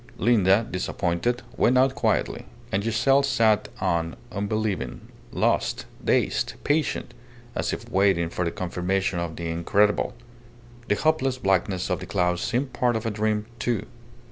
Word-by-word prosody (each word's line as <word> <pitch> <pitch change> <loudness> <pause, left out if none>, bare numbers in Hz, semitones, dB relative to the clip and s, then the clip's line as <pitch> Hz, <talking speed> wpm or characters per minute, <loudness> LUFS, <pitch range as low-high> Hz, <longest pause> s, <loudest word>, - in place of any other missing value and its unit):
Linda, 105 -1 +4
disappointed, 90 +6 -1
went 125 - +4
out 130 +1 +4
quietly; - - 0 0.3
and 100 +1 0
Giselle 135 +5 +3
sat 115 -6 +2
on 85 -1 0 0.2
unbelieving, 100 - -2 0.2
lost, - - 0 0.2
dazed, - - +1
patient, 150 -1 0 0.4
as - - -1
if - - -5
waiting 95 -3 +2
for 90 - -1
the 85 - 0
confirmation 90 +1 -1
of 85 -2 -3
the 85 -1 -4
incredible. 100 +5 +2 0.7
The 105 - +2
hopeless 135 -2 +1
blackness 95 -4 0
of - - 0
the - - -8
clouds 90 0 +1
seemed 130 +3 -1
part 120 -2 +1
of 110 +1 -2
a 115 - 0
dream, 105 0 0
too. 115 -4 -1
105 Hz, 145 wpm, -25 LUFS, 90-120 Hz, 0.7 s, Linda